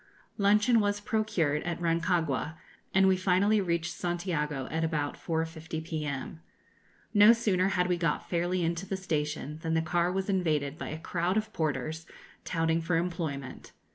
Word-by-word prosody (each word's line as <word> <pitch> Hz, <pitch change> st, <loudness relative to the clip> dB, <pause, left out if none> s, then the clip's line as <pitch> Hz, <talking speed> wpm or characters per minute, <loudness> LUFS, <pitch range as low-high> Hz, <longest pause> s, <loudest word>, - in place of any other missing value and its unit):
Luncheon 210 Hz, +4 st, +4 dB
was 205 Hz, -1 st, +1 dB
procured 200 Hz, -9 st, 0 dB
at 175 Hz, -1 st, -3 dB
Rancagua, 165 Hz, -4 st, 0 dB, 0.4 s
and 190 Hz, 0 st, +4 dB
we 190 Hz, -, +5 dB
finally 190 Hz, +3 st, +3 dB
reached 170 Hz, -2 st, -1 dB
Santiago 165 Hz, -6 st, -2 dB
at 160 Hz, +1 st, -1 dB
about 150 Hz, -3 st, -1 dB
4.50 160 Hz, -1 st, -3 dB
p.m. 155 Hz, -1 st, -4 dB, 0.7 s
No 210 Hz, +2 st, +8 dB
sooner 195 Hz, -5 st, +1 dB
had 180 Hz, -2 st, +1 dB
we 180 Hz, -1 st, +1 dB
got 165 Hz, -3 st, -1 dB
fairly 175 Hz, +1 st, 0 dB
into 170 Hz, +3 st, -2 dB
the 195 Hz, -, -2 dB
station 150 Hz, -4 st, -3 dB
than 160 Hz, 0 st, -1 dB
the 160 Hz, -, +3 dB
car 175 Hz, +2 st, +1 dB
was 190 Hz, +1 st, -2 dB
invaded 155 Hz, -7 st, 0 dB
by -, -, -4 dB
a 155 Hz, -, -4 dB
crowd 175 Hz, +4 st, -1 dB
of 215 Hz, 0 st, -2 dB
Porters 160 Hz, 0 st, -2 dB, 0.4 s
touting 165 Hz, -1 st, +1 dB
for 165 Hz, +1 st, 0 dB
employment. 165 Hz, -6 st, -4 dB
170 Hz, 155 wpm, -29 LUFS, 160-190 Hz, 0.7 s, No